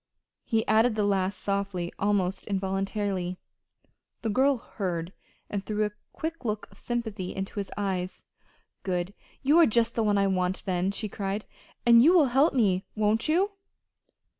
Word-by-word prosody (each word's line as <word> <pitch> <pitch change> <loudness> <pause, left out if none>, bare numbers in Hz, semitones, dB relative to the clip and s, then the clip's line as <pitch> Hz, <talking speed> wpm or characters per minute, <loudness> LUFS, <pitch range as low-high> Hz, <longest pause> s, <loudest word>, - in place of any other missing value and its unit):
He 225 -2 0
added 220 +1 +4
the 210 - +1
last 195 -1 0
softly, 195 -3 -2
almost 195 -2 0
involuntarily. 195 -1 -2 0.9
The 225 - 0
girl 270 +4 +3
heard, 180 -6 -4 0.3
and 200 -1 -3
threw 215 +1 0
a 210 - -3 0.2
quick 330 -1 -5
look 215 -2 -2
of - - -13
sympathy 220 -6 -3
into 195 +2 -4
his 200 - -4
eyes. 190 -3 -2 0.6
"Good! 180 0 -2 0.3
You 295 +5 +5
are 335 - +7
just 230 +1 +2
the 230 - 0
one 210 -2 +2
I 200 - +3
want, 185 -1 0
then," 185 -1 0
she 210 +2 -2
cried. 200 +1 -3 0.4
"And 235 -1 +8
you 320 +8 +6
will 310 -7 +5
help 275 +3 +4
me; 195 -6 +2
won't 215 +5 +1
you?" 375 +6 +3
205 Hz, 160 wpm, -27 LUFS, 190-230 Hz, 0.9 s, And